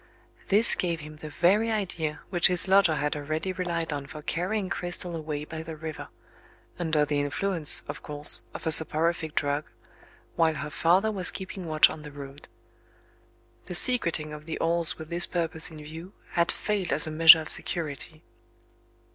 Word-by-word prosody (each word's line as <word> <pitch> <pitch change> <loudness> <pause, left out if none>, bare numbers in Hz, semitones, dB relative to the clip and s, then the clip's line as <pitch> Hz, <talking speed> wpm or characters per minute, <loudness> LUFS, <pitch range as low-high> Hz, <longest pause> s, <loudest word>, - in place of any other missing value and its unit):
This 210 +4 +6
gave 170 -2 -3
him 150 +1 -11
the 155 0 -10
very 200 +9 +1
idea 175 -8 -4
which 175 -2 +4
his 180 0 -1
lodger 190 -4 +3
had 150 0 -2
already 155 +5 -4
relied 170 -4 -4
on 140 -1 -6
for 150 +1 -11
carrying 190 +6 -3
Cristel 175 -1 -3
away 150 -2 -6
by 160 0 -8
the 160 0 -9
river 155 0 -8 0.7
(under 160 -3 0
the 145 0 -2
influence, 165 +2 +4
of - - -8
course, 145 0 +5
of - - -9
a 160 - 0
soporific 160 0 +1
drug), 145 +1 -1 0.7
while 160 -2 +1
her 150 -1 -6
father 185 +8 +1
was 190 -4 +1
keeping 190 -2 -8
watch 155 -1 +5
on 155 - -9
the 150 0 -11
road. 140 0 -11 1.2
The - - -1
secreting 170 - +1
of 150 +1 -11
the 160 - -5
oars 165 -1 +1
with 160 0 -10
this 175 0 +4
purpose 165 -2 -2
in 160 - -13
view, 160 +5 -11 0.2
had 170 0 0
failed 200 -5 -3
as 150 - +5
a 155 - -4
measure 160 +1 +8
of 155 - -9
security. 155 -2 -4
160 Hz, 170 wpm, -26 LUFS, 150-175 Hz, 1.2 s, measure